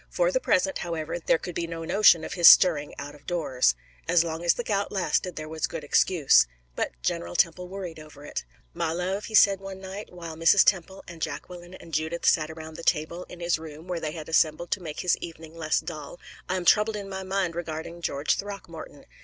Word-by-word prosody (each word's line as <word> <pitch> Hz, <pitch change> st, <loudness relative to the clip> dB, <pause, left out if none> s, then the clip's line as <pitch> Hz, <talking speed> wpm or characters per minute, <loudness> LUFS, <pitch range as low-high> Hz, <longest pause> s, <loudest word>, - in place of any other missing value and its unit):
For -, -, +1 dB
the -, -, +1 dB
present, 290 Hz, -, +1 dB
however, 165 Hz, -1 st, -4 dB
there 165 Hz, -, +2 dB
could 180 Hz, -, -7 dB
be 170 Hz, 0 st, -3 dB
no 165 Hz, -1 st, -6 dB
notion 175 Hz, -3 st, +5 dB
of -, -, -5 dB
his 175 Hz, -3 st, +6 dB
stirring 155 Hz, -6 st, +6 dB
out 145 Hz, +1 st, -7 dB
of 145 Hz, -1 st, -18 dB
doors. 135 Hz, -, +1 dB, 0.3 s
As 170 Hz, -1 st, +4 dB
long 165 Hz, 0 st, -4 dB
as 170 Hz, -, +3 dB
the 240 Hz, -, -3 dB
gout 200 Hz, -3 st, -1 dB
lasted 185 Hz, -1 st, 0 dB
there 155 Hz, 0 st, -6 dB
was 160 Hz, 0 st, -2 dB
a -, -, -4 dB
good 165 Hz, -2 st, -6 dB
excuse. 145 Hz, -, +4 dB, 0.3 s
But -, -, -3 dB
General 85 Hz, +6 st, -2 dB
Temple 180 Hz, +2 st, +1 dB
worried 180 Hz, -4 st, -7 dB
over 150 Hz, -1 st, -13 dB
it. -, -, -4 dB, 0.3 s
"My 160 Hz, -, -1 dB
love," 185 Hz, +4 st, -2 dB
he 220 Hz, -, -4 dB
said 200 Hz, -2 st, +6 dB
one 195 Hz, -1 st, -8 dB
night, 195 Hz, +2 st, -8 dB
while 170 Hz, -2 st, -8 dB
Mrs. 165 Hz, +5 st, +5 dB
Temple 190 Hz, 0 st, +1 dB
and 170 Hz, -2 st, -10 dB
Jacqueline 175 Hz, +4 st, -6 dB
and 165 Hz, -, -13 dB
Judith 160 Hz, +3 st, -2 dB
sat 155 Hz, -1 st, +3 dB
around 160 Hz, 0 st, -9 dB
the 170 Hz, -, -8 dB
table 170 Hz, +2 st, 0 dB
in 175 Hz, -, -12 dB
his 170 Hz, -1 st, +1 dB
room, 160 Hz, +1 st, -10 dB
where 180 Hz, -2 st, -2 dB
they 155 Hz, -1 st, -4 dB
had 155 Hz, -3 st, -7 dB
assembled 160 Hz, +1 st, +1 dB
to 205 Hz, -, 0 dB
make 155 Hz, -4 st, -5 dB
his 180 Hz, -, +2 dB
evening 165 Hz, -1 st, -9 dB
less 160 Hz, -2 st, 0 dB
dull, 155 Hz, 0 st, -8 dB, 0.3 s
"I 185 Hz, -, 0 dB
am 180 Hz, -1 st, -3 dB
troubled 210 Hz, +3 st, +4 dB
in 200 Hz, -1 st, -5 dB
my 190 Hz, -1 st, -5 dB
mind 190 Hz, -2 st, -1 dB
regarding 165 Hz, 0 st, -6 dB
George 145 Hz, -2 st, 0 dB
Throckmorton. 185 Hz, -7 st, -8 dB
170 Hz, 220 wpm, -26 LUFS, 155-185 Hz, 0.3 s, his